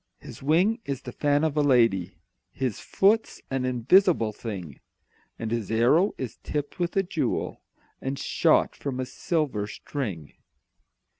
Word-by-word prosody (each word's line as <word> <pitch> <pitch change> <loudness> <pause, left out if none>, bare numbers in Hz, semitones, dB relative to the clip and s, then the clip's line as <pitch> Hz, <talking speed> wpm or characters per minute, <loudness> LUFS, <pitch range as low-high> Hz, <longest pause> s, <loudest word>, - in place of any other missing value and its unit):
His - - -11
wing 175 +11 +3
is 135 -2 -4
the - - -6
fan 145 0 +1
of 155 -2 0
a 150 - +3
lady, 115 -10 +3 0.3
His 130 -6 -2
foot's 215 +3 +2
an 130 -1 0
invisible 130 - +3
thing, 95 - -7 0.6
And 110 -1 -4
his 115 -4 -2
arrow 125 - +3
is 125 -4 -5
tipped 145 +4 -4
with 175 +2 -1
a 195 - +4
jewel, 180 - -2 0.4
And 135 +1 -3
shot - - +2
from 135 -2 -4
a 130 - -1
silver 135 - -1
string. 105 - -5
135 Hz, 145 wpm, -26 LUFS, 115-155 Hz, 0.6 s, a